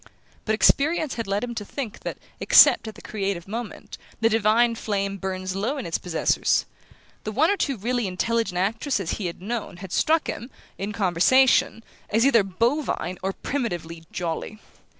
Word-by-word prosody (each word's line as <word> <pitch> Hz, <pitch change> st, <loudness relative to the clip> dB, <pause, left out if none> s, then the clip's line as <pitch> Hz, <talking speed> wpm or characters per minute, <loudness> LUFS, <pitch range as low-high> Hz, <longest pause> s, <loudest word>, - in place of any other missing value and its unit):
But 220 Hz, -, +1 dB
experience 300 Hz, +5 st, +3 dB
had 230 Hz, -3 st, -4 dB
led 200 Hz, +2 st, -1 dB
him 245 Hz, -1 st, -4 dB
to 225 Hz, -3 st, -4 dB
think 230 Hz, 0 st, -6 dB
that, -, -, -5 dB, 0.2 s
except -, -, +6 dB
at 220 Hz, -, -7 dB
the -, -, -14 dB
creative 195 Hz, -4 st, -3 dB
moment, 225 Hz, +2 st, -7 dB, 0.2 s
the 225 Hz, 0 st, +3 dB
divine 225 Hz, +2 st, +3 dB
flame 200 Hz, -3 st, -2 dB
burns 185 Hz, -1 st, -4 dB
low 230 Hz, +9 st, -1 dB
in 265 Hz, -, -5 dB
its 165 Hz, -, -2 dB
possessors. 175 Hz, -3 st, +1 dB, 0.6 s
The 215 Hz, -, -4 dB
one 300 Hz, -, +3 dB
or -, -, +2 dB
two 275 Hz, -9 st, -1 dB
really 240 Hz, +1 st, -1 dB
intelligent 200 Hz, +1 st, -1 dB
actresses 205 Hz, -, -1 dB
he 200 Hz, -, -2 dB
had 175 Hz, +1 st, -8 dB
known 225 Hz, -4 st, -4 dB
had 190 Hz, 0 st, -9 dB
struck 320 Hz, -, +2 dB
him, 235 Hz, +4 st, -5 dB, 0.3 s
in 200 Hz, +2 st, -3 dB
conversation, 225 Hz, +7 st, +3 dB, 0.3 s
as 225 Hz, +4 st, +3 dB
either 235 Hz, -5 st, +5 dB
bovine 200 Hz, -, -1 dB
or 190 Hz, -, -1 dB
primitively 175 Hz, -, -4 dB
"jolly". 175 Hz, +4 st, -4 dB
215 Hz, 170 wpm, -24 LUFS, 190-240 Hz, 0.6 s, except